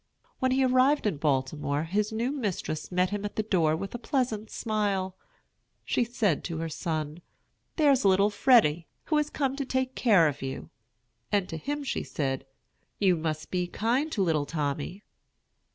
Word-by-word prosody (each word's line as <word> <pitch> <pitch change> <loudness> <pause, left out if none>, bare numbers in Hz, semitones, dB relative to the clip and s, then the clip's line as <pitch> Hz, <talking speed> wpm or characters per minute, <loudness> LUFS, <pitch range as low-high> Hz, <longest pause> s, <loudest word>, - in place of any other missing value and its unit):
When 260 - +2
he 265 +1 +3
arrived 255 +3 +3
in 200 -8 0
Baltimore, 145 +1 0
his 205 +6 -1
new 230 +4 -1
mistress 205 - -3
met 180 +1 +1
him 205 0 -3
at 205 - -4
the 215 - 0
door 165 -7 +2
with 195 +4 -5
a 240 - -4
pleasant 230 -5 -1
smile. 200 -4 -1 0.7
She - - +1
said 220 - 0
to 165 -2 -3
her 165 0 -3
son, 155 0 -3 0.5
"There's 285 -4 +4
little 195 +1 +4
Freddy, 205 - +4 0.2
who 305 - +1
has 300 0 +1
come 270 -3 -1
to 280 - -1
take 260 0 -1
care 200 -12 +4
of 145 -1 -3
you"; 135 0 -5 0.6
and 200 -3 +2
to - - -4
him 290 - -3
she 265 - -2
said, 135 -2 -3 0.5
"You 190 -3 +3
must 155 -1 -3
be 180 -1 0
kind 245 - 0
to 200 - +1
little 155 -5 +1
Tommy." 150 +5 -3
195 Hz, 170 wpm, -28 LUFS, 160-245 Hz, 0.7 s, There's